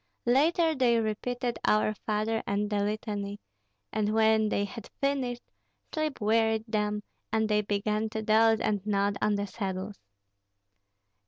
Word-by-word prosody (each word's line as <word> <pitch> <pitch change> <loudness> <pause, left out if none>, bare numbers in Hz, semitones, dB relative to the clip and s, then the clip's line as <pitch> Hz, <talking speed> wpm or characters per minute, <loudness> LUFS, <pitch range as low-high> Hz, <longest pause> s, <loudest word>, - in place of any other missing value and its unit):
Later 320 +6 +3
they 245 -5 +3
repeated 240 +3 -2
"Our 215 0 +3
Father" 215 +1 -1
and 205 +1 -1
the 205 - +1
litany; 205 -1 -3 0.5
and 215 0 0
when 220 -1 +4
they 200 -1 0
had 225 +1 -9
finished, 265 -3 -1 0.5
sleep 310 -2 -2
wearied 220 0 +2
them, 210 -1 -1 0.3
and 220 0 +2
they 210 0 +2
began 210 +1 -1
to 220 0 -4
doze 220 +1 +4
and 205 -3 0
nod 200 -1 +1
on 210 0 +2
the 200 0 -1
saddles. 195 0 -5
215 Hz, 140 wpm, -29 LUFS, 210-225 Hz, 0.5 s, when